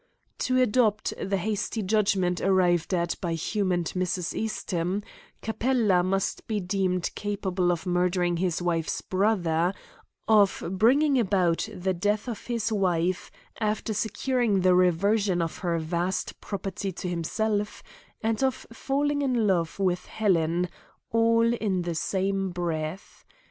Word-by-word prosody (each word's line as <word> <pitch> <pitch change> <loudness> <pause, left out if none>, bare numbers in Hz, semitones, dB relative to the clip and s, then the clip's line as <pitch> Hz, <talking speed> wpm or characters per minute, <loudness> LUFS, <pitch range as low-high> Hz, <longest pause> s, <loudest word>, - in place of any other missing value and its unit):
To 255 0 +1
adopt 220 -3 +2
the 195 0 0
hasty 210 +3 -2
judgment 195 -3 +1
arrived 180 -3 +2
at 170 -2 +1
by 170 -3 -1
Hume 195 +4 -1
and 175 -1 0
Mrs. 180 0 -2
Eastham, 190 -3 -2 0.4
Capella 220 -4 +2
must 190 +1 -1
be 215 -2 -1
deemed 185 -1 -1
capable 190 -3 -1
of 175 +1 -3
murdering 180 -1 +1
his 175 -1 -1
wife's 165 -2 -1
brother, 185 -3 +1 0.5
of 210 -3 +4
bringing 265 +8 +4
about 190 -3 +1
the 190 -1 -1
death 205 +6 0
of 230 -4 -6
his 230 -2 -1
wife 180 -3 0 0.3
after 215 0 -1
securing 220 0 0
the 185 0 +4
reversion 185 +2 +3
of 165 -1 -2
her 170 -2 0
vast 170 +3 -2
property 195 -1 -4
to 180 - -5
himself, 205 +5 -2 0.4
and 225 +1 0
of 265 -2 0
falling 285 +3 0
in 250 -5 +1
love 175 -5 +1
with 180 -2 0
Helen 175 -4 +1 0.4
all 230 +1 +3
in 200 -6 -1
the 170 -1 -2
same 195 +3 -1
breath. 170 0 -4
190 Hz, 135 wpm, -27 LUFS, 175-215 Hz, 0.5 s, of